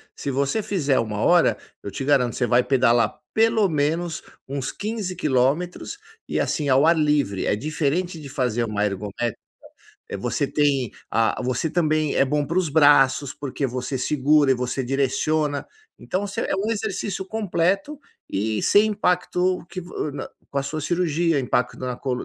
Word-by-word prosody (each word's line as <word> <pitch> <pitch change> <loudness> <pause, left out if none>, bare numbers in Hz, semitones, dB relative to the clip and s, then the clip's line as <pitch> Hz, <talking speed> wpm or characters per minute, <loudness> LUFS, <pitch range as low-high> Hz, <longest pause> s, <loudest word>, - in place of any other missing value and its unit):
se 140 - -4
você 140 +11 0
fizer 145 -9 +1
1 105 -2 -2
hora, - - +4 0.3
eu 100 - -5
te 135 - -5
garanto, 130 -4 +2
você 125 - 0
vai 125 0 +4
pedalar 120 -3 +2 0.2
pelo 220 -3 +3
menos 160 +3 -1 0.2
uns 135 -1 -3
15 205 -3 -4
quilômetros, 155 - 0 0.3
e - - -1
assim, 145 -4 -1
ao 135 +4 +5
ar 165 0 +5
livre, 150 -10 +1
é - - +2
diferente 155 - -2
de 140 -2 -9
fazer 120 -3 -1
uma 105 -2 -1
ergométrica, 105 +3 -2 0.7
é - - -4
você - - -1
tem 140 -6 +1 0.2
ah, 115 +3 +1
você 130 +5 -1
também 155 -3 +1
é - - +4
bom 145 +1 0
para 170 +3 0
os 175 -4 +1
braços 140 -2 +4
porque 140 0 -3
você 130 +2 -3
segura 145 +1 +3
e - - +2
você 125 +1 -2
direciona, 145 +3 0 0.3
então 185 - -2
você 200 0 -3
é - - -1
um 205 +4 -1
exercício 205 -3 -3
completo 205 - -1 0.3
e 105 +2 -1
sem 210 +2 +5
impacto 180 -2 0
que 185 - -6
vo 160 -4 -5
no 145 - -6 0.2
com 140 - -1
a - - 0
sua 155 +3 -4
cirurgia, 165 -2 +1
impacto 125 0 0
na 125 -1 -3
col 125 -1 -3
145 Hz, 170 wpm, -23 LUFS, 130-175 Hz, 0.7 s, ao